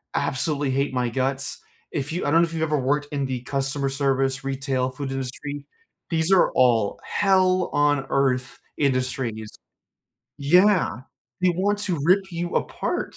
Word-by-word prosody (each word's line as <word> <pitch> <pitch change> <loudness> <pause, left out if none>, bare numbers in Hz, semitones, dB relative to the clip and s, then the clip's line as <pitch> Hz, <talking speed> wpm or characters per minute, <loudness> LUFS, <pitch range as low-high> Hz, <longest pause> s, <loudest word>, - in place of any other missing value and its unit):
absolutely 140 +1 0
hate 140 +1 0
my 125 -2 0
guts. 135 +2 -2 0.3
If 145 0 -3
you 175 +3 -2
I 145 - +1
don't 165 +2 +5
know - - +4
if 165 - -10
you've 160 -1 -1
ever 150 -2 +1
worked 145 +3 0
in 140 -1 -1
the 125 -2 -3
customer 135 +1 -1
service, 135 -1 0
retail, 135 -1 -1
food 135 0 -5
industry. 140 +2 -5 0.4
These 165 +2 0
are 190 - +5
all 115 -5 +3
hell-on-earth 145 -9 +1 0.2
industries. 130 -5 -1 0.9
Yeah. 175 - +3 0.4
They 185 - +5
want 200 +4 0
to 180 -6 -1
rip 190 +2 +3
you 170 +1 -3
apart. - - -2
140 Hz, 145 wpm, -24 LUFS, 130-165 Hz, 0.9 s, don't